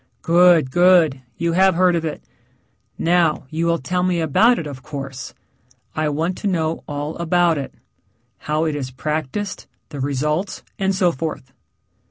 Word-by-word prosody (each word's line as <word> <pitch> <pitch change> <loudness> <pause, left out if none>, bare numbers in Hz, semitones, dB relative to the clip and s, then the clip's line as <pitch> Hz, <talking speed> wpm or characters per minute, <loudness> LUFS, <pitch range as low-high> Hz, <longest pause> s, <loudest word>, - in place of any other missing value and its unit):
"Good, 170 -5 +5
good. 175 -5 +4 0.2
You 170 0 0
have 190 +1 +4
heard 180 0 +3
of 165 - -1
it. 155 -2 -5 0.7
Now, 170 -3 +2
you 165 +2 -1
will 170 0 +2
tell 180 +5 -2
me 180 -1 +1
about 215 - +3
it, 165 - -4
of 140 -3 -7
course. 135 -2 -7 0.6
I 155 -1 0
want 160 +5 -1
to - - -2
know 165 -4 -1
all 145 +1 -4
about 170 -1 +2
it 135 - -7 0.6
how 155 +2 -1
it 155 -2 -1
is 135 -3 -4
practiced, 155 +8 -4 0.2
the 145 -3 -7
results, 150 +7 -2 0.2
and 195 0 +1
so 185 -3 +3
forth." 130 -4 -6
160 Hz, 160 wpm, -20 LUFS, 145-175 Hz, 0.7 s, Good